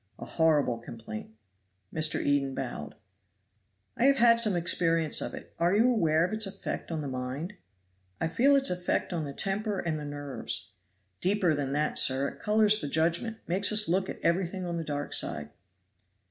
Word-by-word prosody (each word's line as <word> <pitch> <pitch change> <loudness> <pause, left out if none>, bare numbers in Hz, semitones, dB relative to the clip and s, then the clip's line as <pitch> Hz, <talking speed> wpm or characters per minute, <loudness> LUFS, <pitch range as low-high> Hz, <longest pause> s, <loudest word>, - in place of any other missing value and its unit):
"A - - -8
horrible 150 -7 +2
complaint." 115 -2 -8 0.6
Mr. 155 -1 +2
Eden 140 -2 +1
bowed. 120 - -5 1.0
"I 240 - +1
have 275 0 +5
had 230 -1 +6
some 215 -5 +3
experience 165 -2 +2
of - - -4
it. - - -11
Are 175 +3 +3
you 235 +4 +4
aware 165 -7 +3
of 185 - -4
its 215 -1 +1
effect 195 -2 -5
on 160 -2 -2
the 145 - -4
mind?" 130 +8 -4 0.7
"I 165 - 0
feel 265 +12 +4
its 275 -5 +1
effect 180 0 -1
on 165 -3 -2
the 140 - -5
temper 200 +4 -1
and 160 -2 -2
the - - -6
nerves." 145 -9 -4 0.5
"Deeper 185 -3 +2
than 140 -2 -2
that, 150 +1 0
sir 135 +1 +3
it - - -14
colors 215 0 +3
the - - -3
judgment. 170 +9 0
Makes 190 +5 +1
us 215 0 +3
look 190 +2 0
at - - -6
everything 180 +2 0
on 170 -1 -3
the 165 - -3
dark 145 -1 -4
side." - - -3
170 Hz, 180 wpm, -29 LUFS, 145-200 Hz, 1.0 s, had